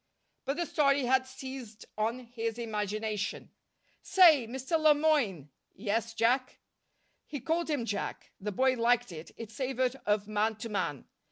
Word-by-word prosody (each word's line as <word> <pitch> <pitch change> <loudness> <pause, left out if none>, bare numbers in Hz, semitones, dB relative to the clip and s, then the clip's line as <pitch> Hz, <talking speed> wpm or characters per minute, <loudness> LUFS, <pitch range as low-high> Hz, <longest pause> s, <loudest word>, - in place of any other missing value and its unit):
But 275 +2 -1
the 345 - 0
story 280 -3 +2
had 260 +1 +2
seized 260 -4 -8
on 225 +4 -1
his 230 -2 -4
imagination. 215 -2 -3 0.5
"Say, 320 -10 +6
Mr. 265 +7 -1
Le 310 -1 +6
Moyne." 245 - +1 0.2
"Yes, 225 +2 -2
Jack." 255 +3 +1 0.7
He 290 - -5
called 325 +6 -1
him 285 -6 0
"Jack." 205 -3 -4
The 210 +2 -3
boy 260 +6 +3
liked 240 -1 +2
it. 160 -1 -8
It 225 -2 -8
savored 255 +2 -1
of 210 -1 +1
man 215 +1 0
to 220 +2 -7
man. 165 - -2
235 Hz, 150 wpm, -30 LUFS, 215-270 Hz, 0.7 s, Say